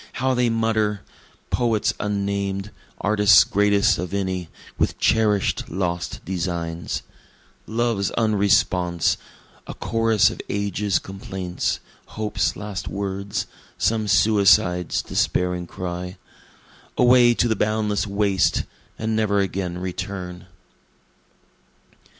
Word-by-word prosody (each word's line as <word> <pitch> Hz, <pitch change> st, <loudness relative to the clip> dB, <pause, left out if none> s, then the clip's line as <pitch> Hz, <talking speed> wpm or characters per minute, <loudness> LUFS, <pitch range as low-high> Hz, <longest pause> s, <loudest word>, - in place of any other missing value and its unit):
how 130 Hz, +2 st, 0 dB
they 125 Hz, -1 st, +2 dB
mutter! 110 Hz, -2 st, 0 dB, 0.5 s
Poets 115 Hz, -4 st, +1 dB
unnamed 100 Hz, 0 st, -2 dB, 0.3 s
artists 105 Hz, -2 st, +6 dB
greatest 100 Hz, 0 st, +2 dB
of 90 Hz, +2 st, -3 dB
any, 95 Hz, -3 st, -2 dB, 0.3 s
with -, -, +1 dB
cherish'd 105 Hz, -3 st, +1 dB
lost 90 Hz, -1 st, -3 dB
designs, 85 Hz, -2 st, -3 dB, 0.6 s
Love's 115 Hz, -3 st, 0 dB
unresponse 100 Hz, -5 st, +2 dB, 0.5 s
a -, -, -7 dB
chorus 115 Hz, -2 st, +2 dB
of -, -, -7 dB
age's 100 Hz, 0 st, 0 dB
complaints 95 Hz, -2 st, -4 dB, 0.4 s
hope's 110 Hz, -1 st, 0 dB
last 105 Hz, -4 st, -6 dB
words, 100 Hz, 0 st, -3 dB, 0.3 s
Some 110 Hz, +1 st, +1 dB
suicide's 95 Hz, -4 st, +3 dB
despairing 90 Hz, -1 st, 0 dB
cry, 90 Hz, +1 st, -5 dB, 0.8 s
Away 120 Hz, -1 st, +6 dB
to 120 Hz, -, +2 dB
the 110 Hz, -, +1 dB
boundless 105 Hz, -1 st, 0 dB
waste, 100 Hz, -1 st, +1 dB, 0.3 s
and 110 Hz, 0 st, -1 dB
never 105 Hz, -2 st, +1 dB
again 95 Hz, -2 st, -1 dB
return. 90 Hz, 0 st, -5 dB
100 Hz, 95 wpm, -23 LUFS, 90-110 Hz, 0.8 s, artists